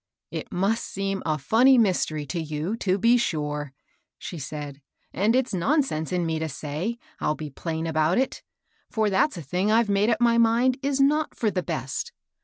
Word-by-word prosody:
" - - -64
It - - -6
must 200 +5 0
seem 195 0 -3
a 155 - +2
fiinny 240 - +5
mystery 175 -8 +1
to 165 +5 -3
you, 155 +6 -3
to 190 -3 +1
be 235 +4 +4
sure," 150 - -2 0.5
she 175 - -7
said; 145 0 -6 0.2
" - - -43
and 210 +6 +2
it's 255 -3 +1
nonsense 190 - 0
in 180 -2 0
me 160 -1 -1
to 160 0 -2
say, 155 - -4 0.2
I'll 150 - 0
be 150 -2 -7
plain 160 +3 -4
about 160 +1 +1
it; 260 +1 0 0.5
for 220 -3 0
that's 190 +4 +2
a 170 - -6
thing 180 +9 0
I've 225 -1 +3
made 200 +2 +3
up 225 -2 +2
my 235 -1 +4
mind 240 +3 +3
is 280 0 0
not 300 +3 +2
for 220 -3 0
the 185 - -1
best. 140 -3 -4
190 Hz, 200 wpm, -25 LUFS, 155-230 Hz, 0.5 s, fiinny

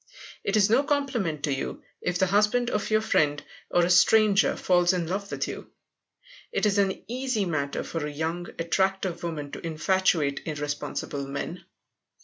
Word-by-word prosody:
It 200 +2 +1
is 200 -2 +5
no 235 +5 +4
compliment 265 - -1
to 145 - +1
you 135 - -4 0.2
if 180 0 -1
the 190 - +3
husband 210 +6 +2
of 210 - -1
your 215 0 +3
friend, 150 -9 +2 0.3
or 175 -1 +3
a - - -1
stranger, 205 +2 +5
falls 175 0 +3
in 175 -2 -1
love 195 +4 -3
with - - -2
you. - - -7 0.8
It 455 - 0
is 205 -1 +2
an 195 -1 0
easy 250 -3 -1
matter 140 -5 -2
for 160 -3 -4
a - - -5
young, 160 +4 -3
attractive 190 +1 0
woman 150 -4 -4
to - - -7
infatuate 165 -2 +1
irresponsible 145 -2 -4
men. 160 +5 -5
180 Hz, 165 wpm, -26 LUFS, 155-205 Hz, 0.8 s, is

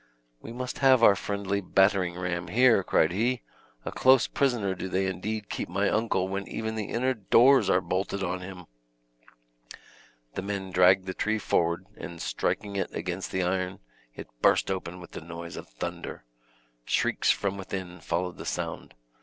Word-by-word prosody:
"We - - -9
must 125 +1 -5
have 130 -3 +5
our 100 - +8
friendly 100 0 -2
battering 95 -2 +2
ram 90 -1 -3
here," 115 +1 +4
cried 80 -2 +2
he; 120 +6 0 0.4
"a - - -3
close 130 -1 +5
prisoner 120 -8 0
do 95 0 -5
they 95 +1 0
indeed 100 +3 -3
keep - - -4
my 100 +3 +1
uncle 110 -4 +1
when 100 +1 -4
even 110 0 -3
the 110 -2 -3
inner 130 +3 +1
doors 125 +5 +5
are 90 - +4
bolted 95 +1 -2
on 90 0 -2
him." 90 -1 -9 1.7
The - - -3
men 100 -1 -4
dragged 90 +1 +5
the 95 - -4
tree 110 +3 0
forward, 85 -3 0
and 85 -1 -8
striking 100 +4 -2
it 95 - -2
against 90 +2 -4
the 95 -1 0
iron, 95 +1 -1 0.4
it - - -8
burst - - +3
open 90 -1 -4
with 85 - -12
the - - -7
noise 85 +1 -8
of - - -9
thunder. - - -6 0.6
Shrieks - - +1
from 100 -1 +1
within 95 -2 -6
followed 90 0 -2
the - - -8
sound. - - -4
95 Hz, 170 wpm, -27 LUFS, 90-110 Hz, 1.7 s, our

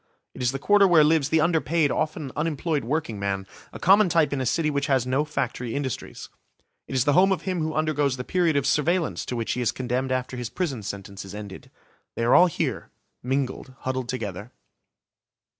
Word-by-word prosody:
It - - -9
is 125 0 +2
the 135 - -3
Quarter 200 +7 +4
where 170 -4 +6
lives 150 -2 +3
the 160 0 +3
underpaid, 160 -2 +2
often 155 -3 -2
unemployed 155 -1 -1
workingman, 105 -8 -2 0.3
a - - -8
common 195 +1 +5
type 160 -4 +2
in 135 - -1
a 130 - -1
city 155 +5 +1
which 140 0 -1
has 135 -4 +2
no 130 +3 +1
factory 125 -5 -3
industries. 135 -4 -5 0.6
It - - -5
is 130 0 +2
the 145 - +3
home 190 +4 +5
of 180 -4 -1
him 185 -2 -2
who 155 0 -2
undergoes 150 -4 +1
the 125 - -4
period 170 +1 +1
of 140 -2 +1
surveillance 165 +2 0
to 125 - -3
which 115 -1 -2
he 125 - -2
is 120 - +1
condemned 130 +1 -2
after 130 0 -2
his 120 -2 -4
prison 145 -11 -3
sentence 100 -1 -7
is 100 +1 -9
ended. 105 -2 -9 0.5
They 115 - -2
are 120 +2 +3
all 180 - +7
here, 170 - -3 0.3
mingled, 130 0 -3
huddled 130 -1 -3
together. 105 -3 -5
140 Hz, 200 wpm, -25 LUFS, 125-160 Hz, 0.6 s, all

